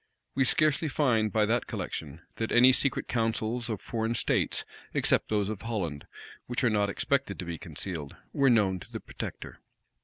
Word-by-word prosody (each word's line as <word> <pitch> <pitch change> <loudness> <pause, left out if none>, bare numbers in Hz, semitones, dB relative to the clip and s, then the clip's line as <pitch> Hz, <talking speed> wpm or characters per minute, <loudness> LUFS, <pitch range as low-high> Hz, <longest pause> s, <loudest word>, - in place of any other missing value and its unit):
We 135 - +2
scarcely 155 +3 +2
find 120 -7 +2
by 110 +1 +3
that 115 +3 0
collection, 80 +1 -5 0.2
that 115 - -2
any 125 +2 +7
secret 135 0 +1
counsels 115 0 -1
of 110 -4 -2
foreign 115 0 -2
states, - - +1 0.3
except - - +3
those 105 -2 +1
of 105 -2 -4
Holland, 95 -11 -3 0.4
which 120 +1 -2
are 120 - +4
not 105 -1 +2
expected 135 0 0
to 90 - -5
be 85 -2 -5
concealed, 80 -7 -5 0.2
were 140 -1 +4
known 100 -6 +3
to - - -13
the - - -4
protector. - - -7
110 Hz, 175 wpm, -29 LUFS, 100-125 Hz, 0.4 s, any